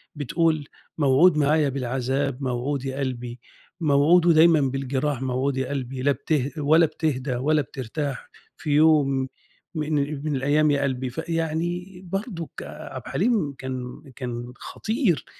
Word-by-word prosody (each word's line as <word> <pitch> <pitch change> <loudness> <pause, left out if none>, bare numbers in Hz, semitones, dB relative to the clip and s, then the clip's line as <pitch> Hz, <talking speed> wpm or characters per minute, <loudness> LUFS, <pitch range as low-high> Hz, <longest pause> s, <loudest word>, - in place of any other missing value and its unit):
بتقول 155 +1 0 0.3
"موعود 150 +3 +5
معايا 150 0 +3
بالعذاب 135 +1 -2
موعود 130 +2 -2
يا 135 +1 -3
قلبي، 125 -2 -4 0.4
موعود 155 +3 +4
ودايمًا 165 -2 +6
بالجراح 135 0 -1
موعود 130 +1 -1
يا 130 0 -1
قلبي، 130 -2 -4
لا 145 +2 +3
بته 140 +1 -1
ولا 155 +3 +5
بتهدى 135 -5 -2
ولا 150 +4 +2
بترتاح، 135 +2 -5 0.3
في 155 - -6
يوم 145 -3 +4 0.5
من 155 0 -2 0.3
من 150 -2 0
الأيام 145 +3 +3
يا 140 - +1
قلبي." 130 -1 -1
فيعني 170 +4 -3
برضه 195 -5 -3
عبدالحليم 195 - -2
كان 130 0 -6
كان 120 -1 -5
خطير، 220 - -1
140 Hz, 125 wpm, -24 LUFS, 130-160 Hz, 0.5 s, ودايمًا